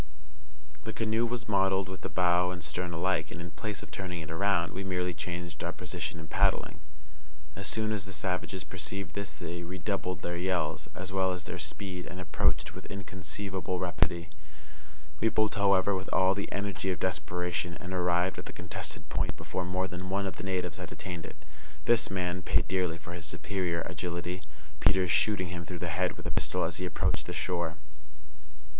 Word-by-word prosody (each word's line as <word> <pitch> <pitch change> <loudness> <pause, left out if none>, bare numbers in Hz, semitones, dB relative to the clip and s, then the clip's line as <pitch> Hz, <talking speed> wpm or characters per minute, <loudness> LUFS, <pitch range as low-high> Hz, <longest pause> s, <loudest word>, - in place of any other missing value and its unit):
The 110 - -3
canoe 115 +1 +2
was 120 0 -3
modelled 95 -2 +3
with 95 0 -6
the - - -3
bow 90 0 +4
and 90 -1 -4
stern 85 +3 -2
alike, 85 -2 +1
and, - - -6
in 85 0 -5
place 105 +6 -4
of - - -11
turning 90 -3 -3
it 80 - -6
around, 85 0 +2
we 95 - -3
merely 90 -1 0
changed 85 0 -4
our - - 0
position 80 - -3
in 80 - -7
paddling. 75 - +2 0.8
As 100 0 -3
soon 110 -1 +2
as 105 -2 0
the 95 - -6
savages 95 0 -1
perceived 95 0 -3
this 100 -1 -3
they 85 0 -5
redoubled 90 +1 -2
their 85 - -1
yells, 90 -3 0
as 95 +1 -4
well 95 -1 +3
as 90 -1 -5
their 90 - -5
speed, 90 +4 -3
and 90 - -6
approached 90 - +2
with - - -8
inconceivable 95 -1 -3
rapidity. 85 -2 +2 0.9
We 115 - +4
pulled, 110 -1 +3
however, 100 -1 +5
with 95 0 -2
all 95 0 +5
the 100 +1 -3
energy 100 -1 -1
of 90 -4 0
desperation, 85 -1 0
and 90 +1 -5
arrived 90 0 +3
at - - -7
the - - -6
contested - - -5
point - - 0
before 90 - -2
more 95 +1 +1
than 90 +1 -5
one 100 +1 +1
of 95 - -3
the - - -5
natives 95 -2 0
had - - -6
attained 85 -3 -5
it. - - -9 0.5
This 120 -1 +5
man 90 -1 0
paid - - +3
dearly 90 -3 +1
for 85 0 -8
his 85 -2 -5
superior 85 +1 0
agility, 90 +1 -2 0.4
Peters 90 0 +5
shooting 90 0 +3
him 85 -1 -3
through 90 +2 -5
the 85 0 -2
head 90 +2 +1
with - - -9
a - - -1
pistol - - +2
as - - 0
he 90 - -1
approached - - +1
the - - -3
shore. 85 -3 0
90 Hz, 190 wpm, -31 LUFS, 85-95 Hz, 0.9 s, however